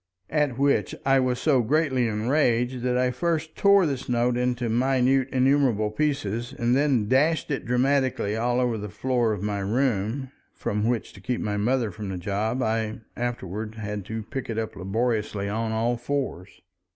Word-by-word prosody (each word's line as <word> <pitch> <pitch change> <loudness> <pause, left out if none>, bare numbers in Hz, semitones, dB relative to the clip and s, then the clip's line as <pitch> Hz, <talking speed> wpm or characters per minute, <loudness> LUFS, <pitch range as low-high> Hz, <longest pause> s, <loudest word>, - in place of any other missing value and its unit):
At 145 -5 +1
which 140 +1 +1
I 135 0 +4
was 125 -1 +1
so 135 -1 +3
greatly 130 -1 +1
enraged 120 +2 +1
that 125 0 0
I 125 0 +2
first 160 +3 -2
tore 200 -2 +5
this 135 -4 -3
note 120 0 +2
into 125 -1 0
minute 130 +2 +2
innumerable 130 -5 +2
pieces, 120 -4 -2
and 120 +1 +2
then 135 -6 +2
dashed 150 +6 +2
it 135 - -2
dramatically 130 -3 +1
all 120 +2 +1
over 120 -3 0
the 105 0 -5
floor 120 +2 0
of 105 -2 -3
my 105 -1 -1
room—from 110 0 -2
which, 120 -3 -2
to 100 - -13
keep 120 +4 -2
my 105 -1 -2
mother 115 +1 +1
from 105 +1 -6
the 95 - -4
job, 105 +7 -1
I 110 0 -1
afterward 110 -3 -4
had 105 -2 -4
to 110 0 -5
pick 130 +4 -6
it 110 - -3
up 110 -1 -3
laboriously 105 +1 -1
on 110 +2 -2
all 115 +2 0
fours. 120 -8 -3
120 Hz, 170 wpm, -25 LUFS, 110-130 Hz, -, tore